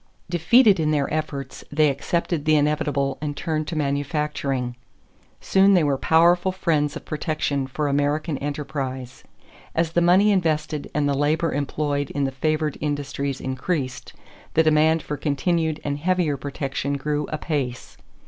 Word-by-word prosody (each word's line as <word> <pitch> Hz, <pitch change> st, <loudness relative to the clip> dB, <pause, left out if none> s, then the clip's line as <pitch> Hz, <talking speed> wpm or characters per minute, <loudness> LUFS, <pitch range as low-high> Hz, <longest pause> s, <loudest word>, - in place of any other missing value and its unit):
Defeated 200 Hz, +4 st, +5 dB
in 155 Hz, -1 st, +1 dB
their 145 Hz, -2 st, 0 dB
efforts, 140 Hz, -4 st, -4 dB
they 155 Hz, +1 st, +4 dB
accepted 155 Hz, +2 st, -2 dB
the 155 Hz, 0 st, +4 dB
inevitable 145 Hz, -2 st, 0 dB
and 145 Hz, -1 st, -4 dB
turned 155 Hz, -2 st, -2 dB
to 170 Hz, -, -4 dB
manufacturing. 140 Hz, -3 st, -1 dB, 0.6 s
Soon 195 Hz, +1 st, +4 dB
they 175 Hz, -, +4 dB
were 145 Hz, -2 st, +2 dB
powerful 170 Hz, +6 st, +3 dB
friends 155 Hz, -6 st, 0 dB
of -, -, -8 dB
protection 150 Hz, -3 st, -2 dB
for 145 Hz, +3 st, -2 dB
American 145 Hz, +1 st, 0 dB
enterprise. 135 Hz, -3 st, -5 dB, 0.5 s
As 165 Hz, -1 st, +1 dB
the 175 Hz, -, +2 dB
money 185 Hz, +5 st, +5 dB
invested 155 Hz, -5 st, 0 dB
and 150 Hz, -1 st, +2 dB
the 140 Hz, -, +1 dB
labor 155 Hz, +4 st, +1 dB
employed 145 Hz, 0 st, -1 dB
in 140 Hz, -, -2 dB
the 135 Hz, -, 0 dB
favored 155 Hz, +2 st, -1 dB
industries 140 Hz, -2 st, -2 dB
increased, 130 Hz, 0 st, -3 dB, 0.4 s
the 160 Hz, -, +5 dB
demand 155 Hz, +1 st, +3 dB
for 150 Hz, -, -4 dB
continued 155 Hz, +2 st, 0 dB
and 145 Hz, 0 st, -2 dB
heavier 175 Hz, -2 st, +1 dB
protection 140 Hz, 0 st, -3 dB
grew 145 Hz, +1 st, -2 dB
apace. 145 Hz, -5 st, -3 dB
150 Hz, 145 wpm, -23 LUFS, 140-160 Hz, 0.6 s, Defeated